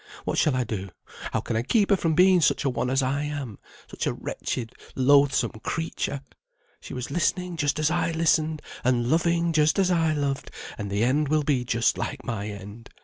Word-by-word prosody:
What -, -, 0 dB
shall 150 Hz, -, +3 dB
I 130 Hz, -, +1 dB
do? 100 Hz, -4 st, -5 dB, 0.4 s
How -, -, 0 dB
can -, -, -3 dB
I 110 Hz, -, +2 dB
keep 205 Hz, -, +2 dB
her -, -, +7 dB
from 165 Hz, -4 st, 0 dB
being 185 Hz, +1 st, +5 dB
such 150 Hz, -, +2 dB
a 135 Hz, -, +2 dB
one 125 Hz, 0 st, -1 dB
as 135 Hz, +1 st, +1 dB
I 135 Hz, +2 st, 0 dB
am; 145 Hz, -7 st, -5 dB, 0.3 s
such -, -, -4 dB
a -, -, 0 dB
wretched, 115 Hz, -2 st, -4 dB, 0.2 s
loathsome 135 Hz, -2 st, +4 dB
creature! 160 Hz, -4 st, -3 dB, 0.6 s
She -, -, -9 dB
was 125 Hz, +1 st, -5 dB
listening 180 Hz, +2 st, 0 dB
just 145 Hz, -3 st, 0 dB
as 155 Hz, 0 st, +1 dB
I 175 Hz, 0 st, +1 dB
listened, 160 Hz, -1 st, +1 dB, 0.2 s
and 120 Hz, -1 st, +1 dB
loving 170 Hz, +1 st, +2 dB
just 155 Hz, -1 st, +3 dB
as 190 Hz, -2 st, +3 dB
I 165 Hz, -3 st, +2 dB
loved, 140 Hz, -2 st, -2 dB, 0.3 s
and 105 Hz, -2 st, -5 dB
the 100 Hz, +2 st, 0 dB
end 140 Hz, +5 st, +2 dB
will 155 Hz, 0 st, +2 dB
be 140 Hz, -4 st, +1 dB
just 115 Hz, -1 st, +1 dB
like 145 Hz, -3 st, -4 dB
my 105 Hz, -3 st, -3 dB
end. 105 Hz, +3 st, -9 dB
145 Hz, 205 wpm, -25 LUFS, 125-160 Hz, 0.6 s, her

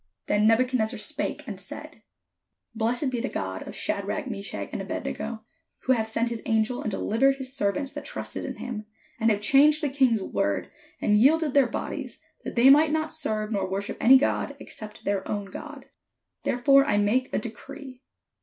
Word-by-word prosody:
Then 210 Hz, +1 st, +3 dB
Nebuchadnezzar 225 Hz, -1 st, +2 dB
spake, -, -, -2 dB
and -, -, -6 dB
said: -, -, -7 dB, 0.7 s
''Blessed 240 Hz, +5 st, 0 dB
be 245 Hz, -, -2 dB
the 265 Hz, -, -2 dB
God 95 Hz, 0 st, -4 dB
of -, -, -7 dB
Shadrach, 200 Hz, +9 st, -2 dB
Meshach, 200 Hz, -4 st, -4 dB
and -, -, -3 dB
Abed -, -, -5 dB
nego, 220 Hz, -1 st, -5 dB, 0.4 s
who 260 Hz, -, 0 dB
hath 220 Hz, -2 st, -1 dB
sent 230 Hz, +1 st, 0 dB
his 230 Hz, -2 st, -4 dB
angel, 225 Hz, +2 st, +1 dB
and -, -, -2 dB
delivered 235 Hz, +7 st, +2 dB
his 265 Hz, 0 st, -4 dB
servants 265 Hz, +8 st, -1 dB
that 290 Hz, 0 st, -6 dB
trusted -, -, -5 dB
in -, -, -5 dB
him, 215 Hz, -4 st, -6 dB, 0.3 s
and 225 Hz, 0 st, +3 dB
have 205 Hz, -2 st, +1 dB
changed 295 Hz, +7 st, +5 dB
the 290 Hz, -, +2 dB
king's 255 Hz, -6 st, +2 dB
word, -, -, -1 dB, 0.3 s
and 210 Hz, 0 st, +3 dB
yielded 300 Hz, +4 st, +4 dB
their 275 Hz, -3 st, +5 dB
bodies, 230 Hz, -, -5 dB, 0.3 s
that -, -, -6 dB
they 250 Hz, +3 st, +7 dB
might 300 Hz, +2 st, +6 dB
not 315 Hz, 0 st, 0 dB
serve 215 Hz, -8 st, -1 dB
nor 195 Hz, -3 st, -1 dB
wor 190 Hz, +1 st, -1 dB
ship -, -, -5 dB
any 265 Hz, +3 st, +8 dB
god, 270 Hz, -, 0 dB
except 215 Hz, 0 st, -8 dB
their 200 Hz, -1 st, -1 dB
own 205 Hz, -2 st, -3 dB
God. 290 Hz, +1 st, -9 dB, 0.6 s
Therefore 275 Hz, +3 st, +5 dB
I 210 Hz, -7 st, +1 dB
make 230 Hz, +6 st, +1 dB
a -, -, 0 dB
decree. 260 Hz, -3 st, -8 dB
235 Hz, 185 wpm, -26 LUFS, 215-275 Hz, 0.7 s, any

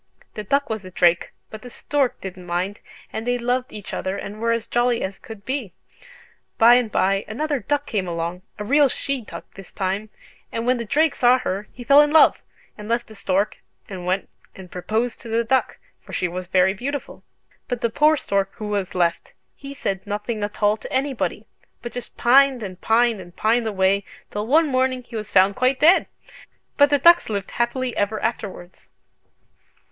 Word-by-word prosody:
The 210 Hz, -, -6 dB
duck 280 Hz, +7 st, +1 dB
was 220 Hz, -2 st, -4 dB
a 185 Hz, -, -9 dB
drake, 175 Hz, -1 st, +2 dB, 0.2 s
but 215 Hz, -, -8 dB
the 250 Hz, -, -10 dB
stork 275 Hz, +1 st, -1 dB
didn't 185 Hz, -1 st, -8 dB
mind, 180 Hz, +4 st, -2 dB, 0.3 s
and 220 Hz, +2 st, -4 dB
they 245 Hz, 0 st, +1 dB
loved 245 Hz, +1 st, -1 dB
each 205 Hz, -2 st, -9 dB
other 190 Hz, +1 st, -3 dB
and 210 Hz, +2 st, -7 dB
were 230 Hz, 0 st, +1 dB
as 230 Hz, -1 st, -1 dB
jolly 240 Hz, 0 st, +1 dB
as 190 Hz, +1 st, -5 dB
could 220 Hz, -3 st, -11 dB
be. 260 Hz, -9 st, -3 dB, 0.8 s
By 230 Hz, +2 st, +7 dB
and 245 Hz, -3 st, +3 dB
by 195 Hz, +1 st, +1 dB
another 290 Hz, +5 st, -2 dB
duck 290 Hz, +6 st, -1 dB
came 195 Hz, -4 st, -2 dB
along, 170 Hz, +1 st, -3 dB, 0.2 s
a 210 Hz, -, -4 dB
real 285 Hz, +5 st, +4 dB
she 275 Hz, +1 st, -3 dB
duck 215 Hz, -, -9 dB
this 195 Hz, -1 st, -11 dB
time, 195 Hz, +3 st, -2 dB, 0.4 s
and 230 Hz, -, -3 dB
when 250 Hz, +1 st, +2 dB
the 235 Hz, -, -4 dB
drake 300 Hz, +6 st, +2 dB
saw 250 Hz, +1 st, +4 dB
her 205 Hz, -4 st, -3 dB
he 245 Hz, -, -10 dB
fell 280 Hz, +4 st, +7 dB
in 295 Hz, -, +3 dB
love, 315 Hz, +1 st, +5 dB, 0.4 s
and 210 Hz, +1 st, -8 dB
left 235 Hz, +1 st, 0 dB
the -, -, -11 dB
stork, 200 Hz, 0 st, -1 dB, 0.3 s
and 185 Hz, -3 st, -7 dB
went 185 Hz, +2 st, 0 dB, 0.3 s
and 185 Hz, -2 st, -12 dB
proposed 220 Hz, +6 st, -2 dB
to 235 Hz, -, -9 dB
the 230 Hz, +1 st, +1 dB
duck: 260 Hz, +3 st, 0 dB, 0.2 s
for -, -, -13 dB
she 180 Hz, -, 0 dB
was 180 Hz, +1 st, -6 dB
very 185 Hz, +1 st, +3 dB
beautiful. 275 Hz, +7 st, -5 dB, 0.4 s
But 245 Hz, -2 st, -3 dB
the 235 Hz, -, 0 dB
poor 305 Hz, +5 st, +4 dB
stork 195 Hz, -6 st, -1 dB
who 215 Hz, -2 st, -6 dB
was 200 Hz, -3 st, -2 dB
left, 170 Hz, -2 st, 0 dB, 0.2 s
he 275 Hz, 0 st, -10 dB
said 195 Hz, -7 st, -3 dB
nothing 210 Hz, +1 st, -3 dB
at 205 Hz, +1 st, -5 dB
all 205 Hz, +1 st, +4 dB
to -, -, -10 dB
anybody, 265 Hz, -1 st, -1 dB, 0.4 s
but 240 Hz, -, -5 dB
just 245 Hz, -, -7 dB
pined 260 Hz, 0 st, +4 dB
and 185 Hz, -2 st, -8 dB
pined 230 Hz, -2 st, +2 dB
and 175 Hz, -1 st, -14 dB
pined 225 Hz, +1 st, +1 dB
away, 200 Hz, -1 st, +2 dB, 0.3 s
till 210 Hz, +1 st, -3 dB
one 315 Hz, +6 st, +5 dB
morning 255 Hz, -1 st, 0 dB
he 240 Hz, -1 st, -12 dB
was 215 Hz, -2 st, -5 dB
found 195 Hz, +1 st, +4 dB
quite 255 Hz, +1 st, +1 dB
dead! 335 Hz, +5 st, +5 dB, 0.7 s
But 285 Hz, 0 st, +5 dB
the 290 Hz, -, +4 dB
ducks 340 Hz, +2 st, +5 dB
lived 200 Hz, -2 st, -3 dB
happily 245 Hz, +1 st, -1 dB
ever 205 Hz, +1 st, 0 dB
afterwards!" 195 Hz, -5 st, -5 dB
225 Hz, 195 wpm, -22 LUFS, 195-255 Hz, 0.8 s, By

